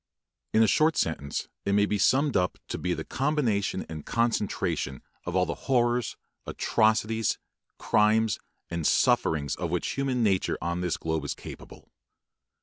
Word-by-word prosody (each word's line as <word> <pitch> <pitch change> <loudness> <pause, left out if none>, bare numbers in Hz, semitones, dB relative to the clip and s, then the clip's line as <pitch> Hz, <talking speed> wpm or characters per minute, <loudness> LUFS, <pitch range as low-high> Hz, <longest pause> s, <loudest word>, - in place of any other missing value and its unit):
In 110 - +5
a - - +4
short 155 +9 +3
sentence 70 -3 -1 0.2
it 100 - 0
may 105 0 +4
be 105 0 -1
summed 135 +7 +3
up 90 0 +1
to - - -3
be 90 -1 -1
the - - -4
combination 125 -10 0
and 80 -2 -7
concentration 95 - -1 0.2
of 90 - -3
all 90 -1 +3
the - - -2 0.2
horrors, 120 -2 +2 0.3
atrocities, 110 0 +1 0.4
crimes, 110 0 +2 0.3
and 85 -2 0
sufferings 70 -3 +2
of 85 - -2
which 90 +1 -1
human 135 -3 0
nature 95 -4 +1
on 85 +1 -2
this 90 -2 -1
globe 80 -2 -2
is 70 - -3
capable. - - -11
100 Hz, 150 wpm, -27 LUFS, 85-115 Hz, 0.4 s, In